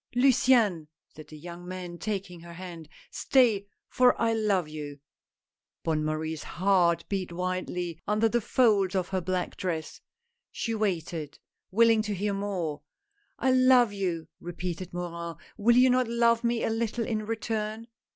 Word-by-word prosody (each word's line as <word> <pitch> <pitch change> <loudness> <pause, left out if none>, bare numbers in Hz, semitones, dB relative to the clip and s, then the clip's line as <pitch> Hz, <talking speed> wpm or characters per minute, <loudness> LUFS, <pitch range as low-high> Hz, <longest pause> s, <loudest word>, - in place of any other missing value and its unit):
"Luciane," 245 - +4 0.2
said 155 - -13
the 155 - -11
young 175 +3 -9
man, 180 -2 -7
taking 195 -4 -4
her 170 0 -11
hand, 170 -3 -9
" - - -30
stay, 225 -7 +3 0.2
for 250 -1 +3
I 230 -1 +2
love 205 -6 +1
you! 150 -2 -7 0.4
" - - -65
Bonne 155 -2 0
Marie's 155 0 -2
heart 175 -1 +2
beat 190 -3 -3
wildly 180 -1 -3
under 215 +2 +3
the 235 +2 0
folds 205 -5 +2
of 185 -2 0
her 190 -1 -1
black 180 +1 -2
dress 165 -4 -4 0.2
— 470 0 -54
she 230 - -3
waited, 170 -8 -2 0.3
willing 225 +2 +4
to 210 -1 -3
hear 200 +2 -1
more. 185 -7 -3 0.6
"I 260 - +2
love 255 -3 +5
you," 175 -5 -2
repeated 175 +1 -5
Morin, 170 -1 -5 0.2
"will 235 +2 +3
you 255 0 +6
not 255 -1 +2
love 235 0 +2
me 235 -1 0
a - - 0
little 230 0 -1
in 215 -2 -2
return 220 0 -3
195 Hz, 160 wpm, -28 LUFS, 170-225 Hz, 0.6 s, you